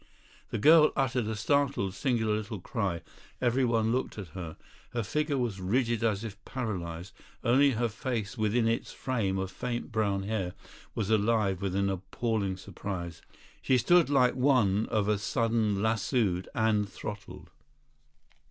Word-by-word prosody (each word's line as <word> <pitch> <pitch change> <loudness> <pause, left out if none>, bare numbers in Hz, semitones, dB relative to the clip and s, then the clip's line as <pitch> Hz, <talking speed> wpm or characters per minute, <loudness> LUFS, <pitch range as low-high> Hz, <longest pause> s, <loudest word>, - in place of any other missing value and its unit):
The - - -2
girl 155 +6 +7
uttered 130 -4 0
a 110 - -2
startled, 135 -3 +1
singular 110 -2 0
little 105 -1 -4
cry; 95 -4 -2 0.4
everyone 120 -3 +2
looked 130 -1 -1
at 95 -6 -6
her. 80 -1 -7 0.4
Her 120 -1 -1
figure 150 +5 -1
was 115 -7 -2
rigid 115 +4 +1
as 110 -2 +1
if 105 -2 -8
paralysed; 95 -8 -5 0.3
only 135 +3 +4
her 120 +1 +1
face 115 -1 -3
within 115 +1 +1
its 115 0 -1
frame 110 -7 -1
of 95 0 -3
faint 120 +4 -4
brown 100 -3 0
hair 100 -4 -2 0.4
was 110 -1 -1
alive 105 -3 +2
with 95 -2 -2
an 100 0 +1
appalling 100 +1 -2
surprise. 90 -3 -6 0.4
She 130 - +3
stood 175 +5 +4
like 130 -3 +4
one 125 -6 +3
of 105 -2 0
a 105 -1 +2
sudden 110 -2 0
lassooed 110 -4 0
and 105 -2 +2
throttled. 105 -2 -8
110 Hz, 145 wpm, -29 LUFS, 100-120 Hz, 0.4 s, girl